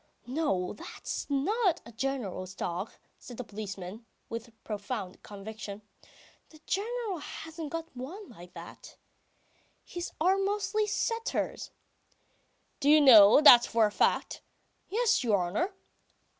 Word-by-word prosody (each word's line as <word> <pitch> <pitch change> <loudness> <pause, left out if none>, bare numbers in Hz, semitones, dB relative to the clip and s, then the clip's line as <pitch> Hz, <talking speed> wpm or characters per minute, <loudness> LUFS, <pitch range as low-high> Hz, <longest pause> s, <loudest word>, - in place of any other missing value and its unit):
"No, 245 - -1
that's 210 - -6
not 365 - +1
the 235 - -11
General's 220 -7 -4
dog," 180 +5 -4 0.3
says 245 - -11
the 250 - -4
policeman, 205 0 -8 0.2
with 230 +1 -6
profound 205 -2 -5
conviction, 210 0 -8 0.7
"the 310 - -17
General 430 -2 -2
hasn't 320 +1 -7
got 330 -1 -6
one 340 +12 -8
like 180 -5 -14
that. - - -11 0.9
His 350 0 -6
are 370 +5 +3
mostly 415 +2 0
setters." 455 +2 -2 1.1
"Do 280 - +2
you 305 +1 +8
know 230 -3 +8
that 245 -5 +9
for 230 -1 +3
a 210 - 0
fact?" - - 0 0.5
"Yes, 455 - +2
your 220 -4 +3
honour." 195 - -1
255 Hz, 120 wpm, -29 LUFS, -, 1.1 s, that